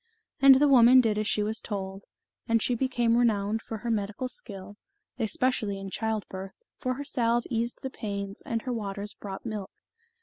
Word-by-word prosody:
And 270 -1 +9
the 290 +3 +5
woman 255 -1 +8
did 220 -4 +2
as 215 - -1
she 210 - +1
was 220 +1 -2
told, 195 -2 -5 0.4
and 230 0 +3
she 245 - 0
became 240 -2 +1
renowned 220 -2 +2
for 225 - -6
her 235 +2 -3
medical 215 +4 -2
skill, 205 -4 -9 0.4
especially 220 -2 0
in 195 0 -7
childbirth, 200 -3 -3 0.3
for 255 -1 -1
her 285 +2 -6
salve 240 -3 +1
eased 235 +1 -2
the 265 - -3
pains, 200 -3 -5
and 230 -1 -2
her 255 - -2
waters 205 -2 -4
brought 195 +1 -8
milk. 210 -4 -4
220 Hz, 175 wpm, -28 LUFS, 200-240 Hz, 0.4 s, And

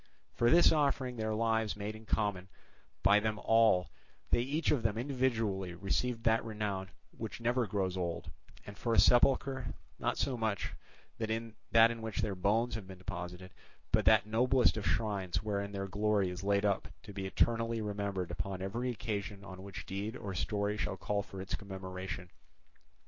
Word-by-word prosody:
For 120 - +3
this 170 +4 +7
offering 140 -4 +1
of 120 - -10
their 110 0 0
lives 110 -1 +1
made 105 +1 -4
in 110 0 -13
common 100 -3 0 0.5
by 100 +2 +6
them 110 0 -1
all 110 -5 +4 0.4
they 120 - +4
each 145 +5 0
of 145 -5 +2
them 110 -1 0
individually 115 -8 0
received 115 +6 -1
that 115 0 +3
renown 105 -4 -3 0.3
which 110 +1 -6
never 120 0 +1
grows 95 -2 -1
old, 85 -2 -3 0.3
and 100 - -9
for 115 +2 0
a - - +6
sepulchre, 130 +1 +4 0.2
not - - 0
so 135 - 0
much 110 -4 -1 0.5
that 110 -1 -2
in 115 0 -2 0.5
which 110 +1 -4
their 105 -3 -1
bones 105 +6 +1
have 105 -3 -5
been 95 -1 -9
deposited, 90 0 -6 0.4
but - - +3
that 110 -2 +6
noblest 125 +4 +3
of 110 -2 -2
shrines 100 -4 0
wherein 100 -1 -2
their 100 -1 -3
glory 100 -1 +1
is 90 +2 -6
laid 100 +1 +2
up 100 -2 +1 0.2
to 105 -3 -10
be 95 -1 -3
eternally 115 +4 +1
remembered 100 -4 -2
upon 90 +3 -3
every 115 +6 -2
occasion 105 -3 -4
on 95 -1 -9
which 95 0 -8
deed 100 +4 -4
or 100 -2 -5
story 105 +2 -1
shall - - -2
call 105 -1 -1
for 95 -1 -9
its 95 - -5
commemoration. 95 -2 -5
105 Hz, 175 wpm, -33 LUFS, 95-115 Hz, 0.5 s, this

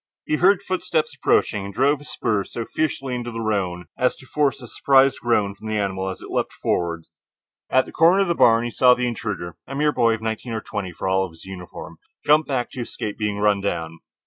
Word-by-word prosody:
He 150 - 0
heard 195 +3 +4
footsteps 165 -5 -1
approaching, 105 -6 +1
and 100 - -6
drove 135 +7 +2
his 145 - -11
spurs 105 -4 -1
so 115 - -3
fiercely 135 -3 -2
into 120 -1 -3
the 115 -1 -6
roan 95 -5 -1
as 125 - +2
to - - -15
force 140 0 0
a 125 - -10
surprised 135 +2 +3
groan 105 -4 +1
from 110 +2 -11
the 110 0 -1
animal 95 -2 -1
as 95 - -7
it - - -9
leaped - - -1
forward. 85 -2 -2 0.6
At 130 - +3
the - - -11
corner 175 +5 +5
of - - -3
the 170 - +2
barn 115 -7 +4
he 120 - -3
saw 125 +2 +5
the 125 - -1
intruder, 105 -8 -4
a 135 - -6
mere 150 +1 +2
boy 115 -5 +3
of 110 - -10
nineteen 110 +2 -3
or 110 - -2
twenty 100 -4 -5
for 90 - -5
all 95 0 +2
of 90 -3 -6
his 80 - -13
uniform 95 -2 -9 0.3
jump 150 +1 +4
back 125 -4 -1
to 125 - -5
escape 110 -3 -5
being 105 -1 -1
run 105 -1 +2
down. 80 -4 -3
115 Hz, 230 wpm, -22 LUFS, 100-135 Hz, 0.6 s, corner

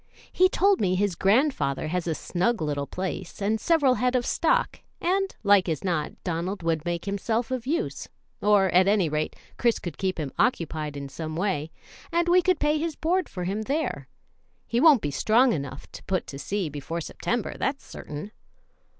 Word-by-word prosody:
He 370 +1 +4
told 395 +1 +3
me 185 -2 +2
his 200 0 +1
grandfather 195 - +1
has 180 +1 -2
a 160 - 0
snug 225 +10 0
little 145 -2 -2
place 185 -1 -5
and 215 +2 0
several 305 -6 +4
head 250 0 +1
of 245 -1 +1
stock, - - +1 0.2
and, 385 +2 0
like 200 -3 +5
as 155 -3 -2
not, 170 -5 -1
Donald 175 +2 -3
would 165 -1 0
make 175 -1 -2
himself 220 +4 -1
of 255 -1 -3
use, 335 +7 -2 0.3
or, 205 -2 +4
at 185 +2 +5
any 200 -5 +3
rate, 150 +1 -2 0.2
Chris 235 -1 +3
could 175 -4 -7
keep 185 -3 -1
him 145 -4 -3
occupied 155 - 0
in 140 0 -5
some 155 +3 -6
way, 170 -4 -1 0.4
and 340 +1 +1
we 360 +1 +5
could 365 -1 +2
pay 300 +1 +2
his 325 -1 -2
board 360 +3 0
for 180 - -5
him 195 +4 -2
there. 285 +8 -2 0.6
He 235 +1 0
won't 300 -7 +6
be 145 - -1
strong 230 - +3
enough 140 -3 -5
to - - -10
put 185 -1 -1
to 140 - -8
sea 195 +2 -2
before 150 +3 -5
September, 215 +8 -3
that's 275 +1 -2
certain." 150 +8 -8
195 Hz, 185 wpm, -26 LUFS, 165-255 Hz, 0.6 s, won't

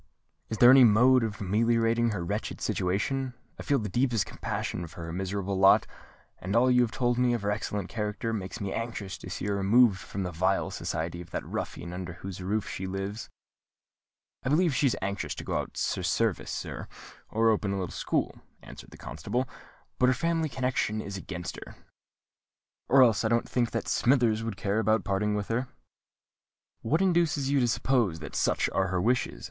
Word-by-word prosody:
Is 110 - -3
there 120 +2 +8
any 135 -1 +8
mode 125 +3 +5
of 110 -2 -4
ameliorating 115 +3 +2
her 95 -6 -3
wretched - - -3
situation? 125 +8 -1 0.2
I - - -4
feel 140 - +1
the 110 - -3
deepest 120 0 +1
compassion 85 - -4
for 85 +1 -9
her 80 - -6
miserable 95 +1 -2
lot; 95 0 +6 0.5
and 95 +4 -3
all 125 +2 +5
you 125 0 +5
have 120 - +2
told 120 +1 0
me 125 -1 +3
of 115 - -4
her 100 - +1
excellent 105 -2 -3
character 105 +2 -3
makes 95 -4 -5
me 100 -2 -3
anxious 115 -4 -4
to - - -9
see - - -5
her 100 0 0
removed 100 +1 +4
from 100 - -5
the 90 - -3
vile 95 +4 0
society 85 +2 -3
of 85 - -11
that - - -4
ruffian 85 - -5
under 90 -2 -5
whose 95 +1 -8
roof 100 +3 -1
she 95 - -5
lives." 95 +3 -5 1.1
"I - - -2
believe 165 +2 +3
she 140 - +3
is 125 - 0
anxious 100 +1 -3
to - - -7
go - - -2
out - - -6
to - - -1
service, - - 0
sir, - - -5 0.4
or 115 +1 +3
open 105 -2 0
a 100 - -1
little 90 -3 -3
school," - - -2 0.2
answered - - -11
the - - -14
constable; 130 +2 -3 0.5
"but 125 - +5
her 130 - +3
family 165 +1 0
connection 125 -4 -1
is 100 -2 -5
against 90 -2 -6
her. - - -10 1.1
Or 135 +1 +7
else 110 -5 +3
I - - +2
don't 115 +1 +1
think 120 -2 0
that - - -3
Smithers 120 -4 +2
would 115 -3 -4
care 100 +1 0
about 110 -1 +2
parting 105 +2 0
with 105 -1 -3
her." 125 +3 -1 1.1
"What 160 +11 +1
induces 165 -7 +2
you 140 - +3
to 125 - +2
suppose 115 -7 +1
that 75 -4 -9
such - - +1
are 95 0 +1
her 95 0 -1
wishes?" 115 - 0
110 Hz, 195 wpm, -28 LUFS, 95-125 Hz, 1.1 s, there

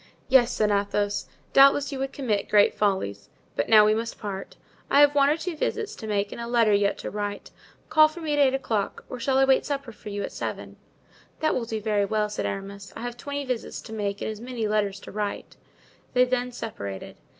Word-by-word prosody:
"Yes," 255 -2 +5
said 210 -1 +1
Athos, 205 0 0 0.3
"doubtless 275 +1 +6
you 275 - -4
would 270 0 -2
commit 220 -7 -2
great 205 -1 +5
follies! 190 - -1 0.3
But 115 - -1
now 215 -1 +8
we 215 - +4
must 230 +1 -3
part. 195 -2 -6 0.3
I 280 - +5
have 290 0 +7
one 280 -1 +4
or 300 - +2
two 340 0 -4
visits 435 +7 -2
to 220 - -7
make 205 -1 -1
and - - -6
a 235 - -4
letter 230 -3 +3
yet 200 0 +2
to - - -5
write. 205 -1 -4 0.4
Call 310 0 +7
for 310 +3 -10
me 315 -3 -2
at 290 - +1
eight 270 -2 +4
o'clock 225 -6 -2
or 250 - -6
shall 265 +2 +1
I 270 - +5
wait 265 0 +4
supper 275 -4 -4
for 210 -1 -10
you 205 0 -3
at - - -5
seven?" - - -6 0.6
"That 310 - +1
will 240 - -1
do 220 -1 -3
very 210 -1 +1
well," 210 0 0
said - - -2
Aramis. 195 0 -6
"I - - -7
have 245 0 -4
twenty 285 +3 -5
visits 250 -3 -3
to 220 - -10
make 205 -2 -3
and - - -2
as 215 0 -9
many 240 -3 -3
letters 205 -2 0
to - - -10
write." 210 0 -4 0.6
They 250 0 +6
then 250 0 -1
separated. 100 - -6
225 Hz, 225 wpm, -26 LUFS, 205-270 Hz, 0.6 s, now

